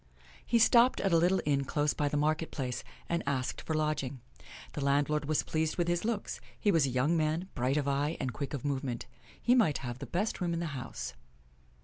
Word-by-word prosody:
He 235 - +2
stopped 235 +2 +5
at 195 - +1
a - - +7
little 180 +3 +3
inn 140 -2 +2
close 145 +2 0
by 145 - 0
the 145 - -1
market 155 +2 +1
place, 125 -3 -3 0.2
and 170 0 0
asked 130 -2 -1
for 160 - -2
lodging. 150 -4 -1 0.5
The 145 - -3
landlord 145 +2 +2
was 155 0 +1
pleased 160 0 -1
with 175 -1 +1
his 175 0 +1
looks. 220 -2 -2 0.2
He 205 - +3
was 160 -6 +3
a - - -1
young 130 +6 +2
man, 160 +3 0
bright 130 +2 0
of 145 -2 0
eye 145 +3 0
and 130 -3 -2
quick 140 +6 -4
of 140 - -6
movement. 135 -4 -2 0.3
He 240 - +3
might 220 - +4
have 120 0 -5
the 140 - -6
best 200 +3 -1
room 170 -1 0
in - - -2
the 170 - -2
house. 125 -3 -5
150 Hz, 220 wpm, -31 LUFS, 140-170 Hz, 0.5 s, a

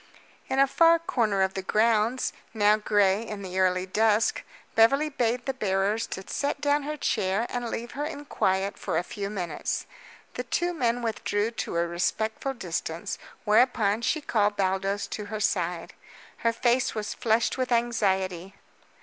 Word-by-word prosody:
In 265 - -1
a 275 - +6
far 330 +4 +5
corner 225 -12 +1
of 190 0 0
the 190 - -3
grounds, 225 +4 +1 0.2
now 210 0 +5
gray 205 -1 +2
in 210 -3 -6
the 185 0 -3
early 185 0 +2
dusk, 215 +3 +2 0.3
Beverly 275 +7 +4
bade 245 -3 -1
the 270 - -1
bearers 205 -1 0
to 190 - -6
set 285 0 -2
down 290 +1 +2
her 300 +2 -4
chair 195 -3 0
and 245 -1 -3
leave 235 +1 -5
her 285 - -4
in 290 -1 -6
quiet 190 -6 0
for - - -2
a - - +1
few 200 +2 -5
minutes. 180 -7 -3 0.5
The - - -4
two 350 0 -1
men 245 -6 0
withdrew 220 -1 -1
to 230 - -4
a 170 - +2
respectful 220 +9 -1
distance, 170 -5 -4 0.3
whereupon 215 -1 +3
she 310 +6 0
called 210 -6 +1
Baldos 195 +1 0
to 210 - -5
her 215 +1 -5
side. 180 -5 -1 0.4
Her 230 - +1
face 245 +2 +1
was 210 -1 -3
flushed 230 +1 +1
with 255 -1 -1
anxiety. 195 -6 0
215 Hz, 165 wpm, -27 LUFS, 195-245 Hz, 0.5 s, a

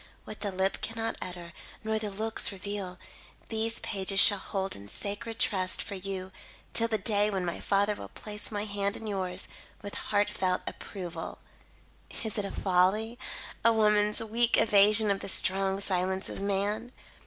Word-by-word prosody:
What 215 - -8
the 205 -2 -2
lip 190 +1 0
cannot 225 0 -2
utter, 175 -2 -7 0.3
nor 220 0 0
the 215 -1 -3
looks 220 +3 +1
reveal, 195 -2 -5 0.5
these 225 +1 0
pages 195 -1 +1
shall 205 -1 +7
hold 195 -1 -3
in 100 0 -11
sacred 205 - -4
trust 185 -6 +2
for 210 - -4
you 190 -1 -5 0.4
till 230 - +4
the 220 -1 0
day 205 +1 +3
when 190 -3 -2
my 170 - -3
father 205 +1 +2
will - - -9
place 210 -1 -5
my 210 -1 -2
hand 200 0 -1
in 225 - -9
yours, 190 -3 -2 0.4
with 205 - -6
heart 205 0 0
felt 185 -3 0
approval. 175 -4 -6 0.9
"Is 220 -1 -2
it 205 - -1
a - - -4
folly? 200 +6 +1 0.4
A 230 - +6
woman's 210 -1 +3
weak 230 +2 +3
evasion 210 0 +6
of 195 - 0
the - - -2
strong 190 +1 +2
silence 190 0 0
of - - -6
man? 205 +4 -1
205 Hz, 165 wpm, -29 LUFS, 190-215 Hz, 0.9 s, shall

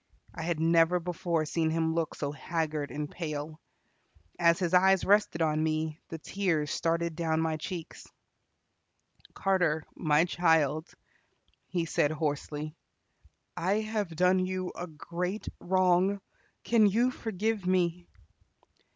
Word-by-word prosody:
I - - -6
had 165 -1 -1
never 165 +2 +4
before 170 -2 -1
seen 160 +1 0
him 160 0 0
look 165 -1 -1
so 145 -1 -3
haggard 150 0 -2
and 150 0 -4
pale. 155 -1 -5 0.8
As 170 -1 +5
his 180 -2 -1
eyes 190 +1 +5
rested 200 -5 +3
on 155 -1 +1
me, 155 0 -1
the 165 - -5
tears 160 -3 -1
started 165 0 0
down 160 -1 0
my 160 -1 0
cheeks. 165 +1 -7 1.3
"Carter, 180 -5 +1
my 155 +1 +3
child," 160 -3 +2 0.8
he 175 -2 -1
said 150 -2 +1
hoarsely, 150 0 -3 0.8
"I 195 +5 +1
have 215 -6 -3
done 180 +2 +4
you 185 0 -3
a 180 - -5
great 175 +5 -4
wrong. 185 +2 +2 0.4
Can 225 -3 +4
you 235 +6 +2
forgive 220 -3 -2
me?" 180 -1 +1
170 Hz, 125 wpm, -29 LUFS, 155-185 Hz, 1.3 s, As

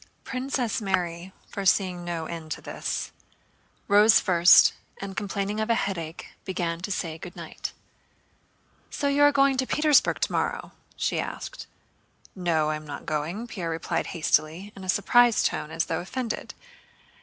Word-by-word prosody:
Princess 255 -3 -2
Mary, 180 -2 -2 0.2
foreseeing 185 -2 +1
no 170 -2 -3
end 160 -1 -7
to - - -3
this, - - -4 0.8
rose 210 +2 +6
first, 175 -1 +6 0.3
and 195 -1 -6
complaining 205 0 -2
of 220 +1 -1
a 230 - +4
headache 170 -6 -4
began 170 -3 -2
to 185 +3 -5
say 165 -4 -3
good 175 - -9
night. - - -6 1.2
"So 285 - -2
you 280 +1 +2
are 290 0 +7
going 275 -1 +3
to 260 0 0
Petersburg 300 -2 +3
tomorrow?" - - -1 0.2
she - - -1
asked. - - -6 0.7
"No, 165 -4 +1
I 155 - -1
am 150 0 -12
not 145 - -7
going," 165 +8 -3
Pierre 185 -8 -5
replied 165 0 -2
hastily, 170 +3 0
in 195 - -10
a 185 - -7
surprised 240 +5 +4
tone - - 0
and 155 - -12
as 165 0 0
though 165 - -2
offended. 235 +5 -4
190 Hz, 155 wpm, -26 LUFS, 165-225 Hz, 1.2 s, are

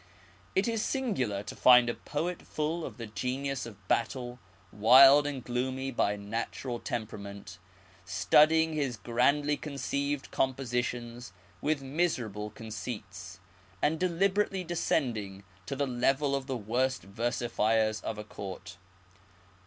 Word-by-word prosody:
It 195 - +2
is 225 -2 0
singular 130 - -1
to - - -8
find 125 -1 +7
a 120 - 0
poet 170 +8 -4
full 160 +2 -3
of - - -7
the 115 - -6
genius 130 +5 -3
of 105 -5 -14
battle, 125 0 -1 0.3
wild 135 +7 +7
and 135 -4 -4
gloomy 130 +2 -2
by 105 -4 +1
natural 115 +4 -4
temperament, 100 -5 -6 0.4
studding 150 - +4
his 140 -6 -1
grandly 140 +7 +1
con 150 - -7
ceived 140 0 -2
compositions 125 -3 -2 0.3
with 150 -2 0
miserable 130 - -1
conceits, 105 -5 -7 0.4
and 155 +2 +1
deliberately 190 +2 +1
descending 115 - -1 0.2
to - - -3
the 140 +1 0
level 135 +3 +1
of 135 -1 -4
the 130 -2 -2
worst 125 +5 -1
versifiers 110 0 0
of 110 - -4
a 105 - -5
Court. 95 -2 -8
125 Hz, 125 wpm, -30 LUFS, 110-145 Hz, 0.4 s, find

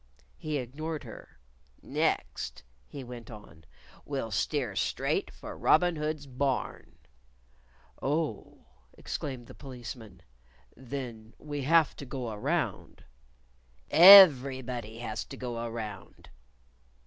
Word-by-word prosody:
He 155 -1 -3
ignored 150 +5 -5
her. - - -12 0.5
"Next," - - -2 0.2
he 140 - -8
went 120 -2 -10
on 95 -8 -13 0.4
"we'll 135 -6 -4
steer 120 +1 -1
straight - - -1
for - - -10
Robin 175 +2 +3
Hood's 150 -1 -3
Barn." 135 -1 -3 1.0
"Oh!" 145 -4 -3 0.3
exclaimed 130 -4 -5
the - - -13
Policeman 120 -6 -10 0.5
"Then 120 -4 -7
we 145 -1 -6
have 160 0 +4
to 140 - -8
go 125 -3 -5
around." 105 -1 -3 0.9
"_Every_body 130 - +7
has 110 -2 -4
to 135 - -10
go 120 -2 -5
around." 110 -5 -8
130 Hz, 100 wpm, -29 LUFS, 115-145 Hz, 1.0 s, Every_body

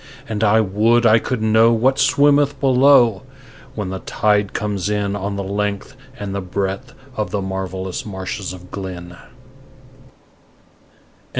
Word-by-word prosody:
And 110 -1 -3
I 110 +1 +4
would 110 +4 +2
I 110 0 +6
could 115 -1 -3
know 110 +1 +4
what 130 +4 +2
swimmeth 145 0 +3
below 130 -5 +4 0.5
when 105 -4 -4
the 95 0 -5
tide 105 0 0
comes 105 -3 -3
in 100 -1 -1
On 100 0 -3
the 100 - -3
length 100 +4 -3 0.2
and 100 -1 -5
the 100 - -3
breadth 100 +6 -4 0.2
of 105 -2 -2
the 105 - -2
marvellous 95 -1 -4
marshes 95 -1 -5
of 90 0 -12
Glynn. 90 -3 -7
105 Hz, 135 wpm, -19 LUFS, 95-115 Hz, 0.5 s, I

